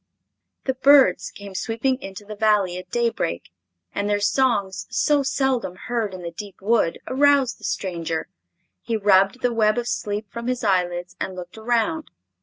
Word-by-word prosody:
The 265 - 0
birds 260 -9 +5
came 200 -1 -10
sweeping 245 +6 -1
into 195 +2 -8
the 215 +1 -7
Valley 205 -4 +2
at 180 0 -12
daybreak, 230 - -1 0.4
and 205 +1 -1
their 205 0 +2
songs, 205 -4 +1
so 295 -1 +2
seldom 265 -8 0
heard 220 -1 -3
in 180 - -9
the 170 - -5
deep 200 +3 -9
wood, 200 -4 +2
aroused 275 -1 +3
the - - -19
stranger. 165 -4 -2 0.6
He 230 -1 -1
rubbed 195 +3 +3
the 245 -1 +1
web 215 -1 +3
of 240 0 -1
sleep 210 -2 -2
from 235 0 -6
his 250 -1 -1
eyelids 180 -3 0
and 190 - -3
looked 180 -1 -9
around. 240 +8 0
210 Hz, 165 wpm, -23 LUFS, 190-245 Hz, 0.6 s, birds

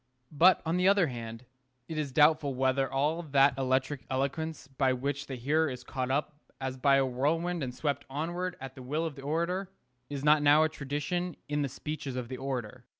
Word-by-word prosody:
But, 170 +5 +5
on 165 +2 +1
the 180 +1 +3
other 200 -2 +5
hand, 115 -3 -6 0.4
it 160 - -5
is 145 -3 -2
doubtful 150 -1 +4
whether 130 +1 +1
all 150 +5 +1
that 140 -4 +4
electric 130 +1 0
eloquence 140 +3 -2
by 135 -1 +1
which 140 +2 -3
the 135 - -4
hearer 150 +6 +1
is 125 -1 -7
caught 130 0 -3
up 145 +3 0 0.3
as 130 -1 -3
by 135 +1 +4
a 135 - +3
whirlwind 160 +7 0
and 130 -2 -2
swept 140 +3 -2
onward 175 +6 -3
at 135 -1 -7
the 130 - -11
will 150 +6 -2
of 160 - -3
the 135 - -11
orator, 170 +6 -1 0.4
is 140 -1 -4
not 150 0 +6
now 145 +2 +6
a 160 - +2
tradition 150 +4 -3
in 150 0 -1
the 140 - -1
speeches 140 0 -5
of 125 -2 -4
the 130 - -5
orator. 130 -3 -4
140 Hz, 205 wpm, -30 LUFS, 130-155 Hz, 0.4 s, not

